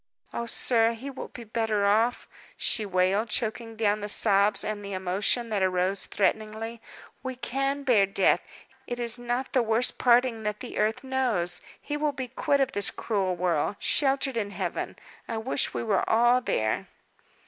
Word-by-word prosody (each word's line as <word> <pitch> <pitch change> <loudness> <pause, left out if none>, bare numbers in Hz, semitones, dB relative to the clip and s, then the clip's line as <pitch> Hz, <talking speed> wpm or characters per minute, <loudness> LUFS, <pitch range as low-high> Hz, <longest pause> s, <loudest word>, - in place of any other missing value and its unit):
"Oh, 235 - -3
sir, 230 -1 +4
he 260 +5 -7
will 265 - -7
be 240 - -10
better 220 -2 0
off!" 220 +4 +2 0.3
she 215 -3 +1
wailed, 190 +4 +1
choking 225 +1 -2
down 215 -1 +1
the 205 - -4
sobs 205 0 +3
and 210 -1 -4
the 200 0 -6
emotion 190 +6 0
that 210 -3 -1
arose 185 +1 +1
threateningly. 220 +3 -2 0.4
"We 260 0 -5
can 275 +3 -2
bear 225 -8 +4
death; 195 -1 +3 0.5
it 245 - -4
is 235 0 +2
not 245 +2 -3
the 255 - +4
worst 230 +2 +1
parting 245 -2 +3
that 210 -1 -3
the - - -6
earth 220 +4 0
knows. 250 -10 0 0.2
He 295 0 -4
will 295 -1 0
be 260 -3 -5
quit 280 +3 +1
of 270 -1 +1
this 205 -4 +1
cruel 195 -5 -1
world, 175 +1 0
sheltered 270 -1 +1
in 205 -3 -1
Heaven. 200 - -4 0.3
I 230 - -3
wish 240 +5 0
we - - -2
were 205 -5 +1
all 240 +3 +4
there!" 110 - -1
225 Hz, 170 wpm, -27 LUFS, 205-245 Hz, 0.5 s, sir